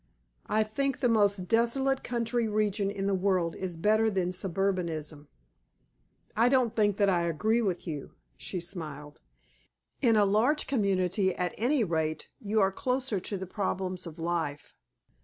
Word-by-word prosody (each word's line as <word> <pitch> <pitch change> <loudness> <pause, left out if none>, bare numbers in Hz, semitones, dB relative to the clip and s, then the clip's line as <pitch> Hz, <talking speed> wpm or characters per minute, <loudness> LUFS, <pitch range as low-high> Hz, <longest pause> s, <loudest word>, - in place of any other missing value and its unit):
I 215 +1 +2
think 270 +6 -2
the 250 - +2
most 205 -5 +2
desolate 265 +5 +1
country 235 -1 -1
region 210 -1 0
in 200 -1 -3
the 200 - +1
world 185 -3 +1
is 180 -3 -5
better 215 +5 +3
than 185 -3 0
suburbanism." 170 -5 -2 1.1
"I 235 +3 +4
don't 250 -3 +2
think 205 -2 +2
that 200 - +3
I 175 -3 +2
agree 220 +9 +1
with 185 -6 -2
you," 150 -5 -6 0.2
she 180 - -5
smiled. 150 -5 -6 0.8
"In 230 -4 +4
a 210 -1 +5
large 230 +10 +2
community 195 -5 +1
at 180 -1 -2
any 250 +3 +2
rate 160 -4 -2
you 215 +1 0
are 195 0 +3
closer 250 0 -1
to 200 +2 -4
the 190 - -5
problems 185 -2 -3
of 165 0 -9
life. 165 -4 -3
195 Hz, 155 wpm, -29 LUFS, 175-225 Hz, 1.1 s, a